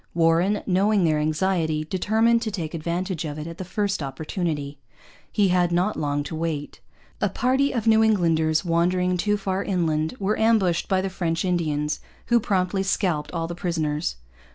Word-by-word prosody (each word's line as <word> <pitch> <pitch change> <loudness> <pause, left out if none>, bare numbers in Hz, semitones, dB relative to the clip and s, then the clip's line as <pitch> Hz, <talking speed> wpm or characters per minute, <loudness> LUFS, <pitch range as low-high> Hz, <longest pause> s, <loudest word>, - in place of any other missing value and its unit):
Warren, 170 +5 +2
knowing 200 +1 +2
their 155 -2 +2
anxiety, 155 0 0
determined 220 +7 +2
to 230 - -2
take 170 -6 -4
advantage 170 +2 -2
of 150 -2 -5
it 155 - -5
at 165 +1 -8
the - - -3
first 195 -1 -2
opportunity. 145 0 -3 0.5
He 205 -3 +2
had 180 -1 +2
not 180 +5 +1
long 145 -1 -1
to 145 - -6
wait. 155 -3 -3 0.4
A - - +2
party 265 +3 +1
of 230 -4 -2
New 220 -1 +5
Englanders, 165 -6 +2
wandering 180 +2 +1
too 210 +4 +1
far 195 -1 -2
inland, 160 -2 0
were 200 +2 0
ambushed 215 -6 +2
by 190 -1 +2
the 195 - -2
French 165 -2 -1
Indians, 155 -4 -1 0.3
who 235 0 +5
promptly 190 -2 0
scalped 175 -6 0
all 165 -2 -2
the 170 - -5
prisoners. 155 - -2
175 Hz, 170 wpm, -24 LUFS, 160-195 Hz, 0.5 s, New